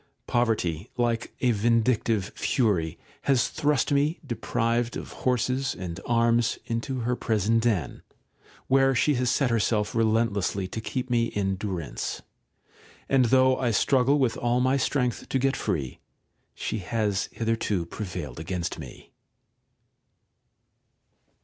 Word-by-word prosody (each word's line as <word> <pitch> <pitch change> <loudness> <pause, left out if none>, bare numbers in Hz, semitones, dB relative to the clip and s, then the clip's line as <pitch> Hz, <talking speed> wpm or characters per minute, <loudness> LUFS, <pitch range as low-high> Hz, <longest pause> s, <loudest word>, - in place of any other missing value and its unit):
Poverty, 110 -6 0
like 120 -1 0
a 125 - +3
vindictive 115 -2 +1
fury, 95 - 0 0.3
has 130 -4 +3
thrust 150 -2 +1
me, 145 +4 +2
deprived 120 -1 -1
of - - -7
horses 130 +1 0
and 90 -1 -6
arms, 115 0 +2
into 125 +2 -3
her 125 +2 0
prison 110 -1 +1
den, 105 - -1 0.6
where 135 0 +3
she 150 +5 +3
has 125 -2 +1
set 130 0 +2
herself 110 -2 +1
relentlessly 110 -4 +1
to 110 - -5
keep 125 +3 -4
me 120 -1 +3
in 95 -3 -1
durance; 95 -5 -4 0.9
and 135 -2 +4
though 130 +2 +4
I 125 - +1
struggle 130 +5 +3
with 130 -5 +1
all 120 +1 +1
my 130 +2 +3
strength 130 -2 -1
to - - +1
get 135 +1 +1
free, 70 -7 -3 0.6
she 110 - -3
has 105 0 -1
hitherto 110 -5 -1
prevailed 85 - -6
against 85 +1 -3
me. 65 -6 -11
115 Hz, 125 wpm, -26 LUFS, 100-125 Hz, 0.9 s, and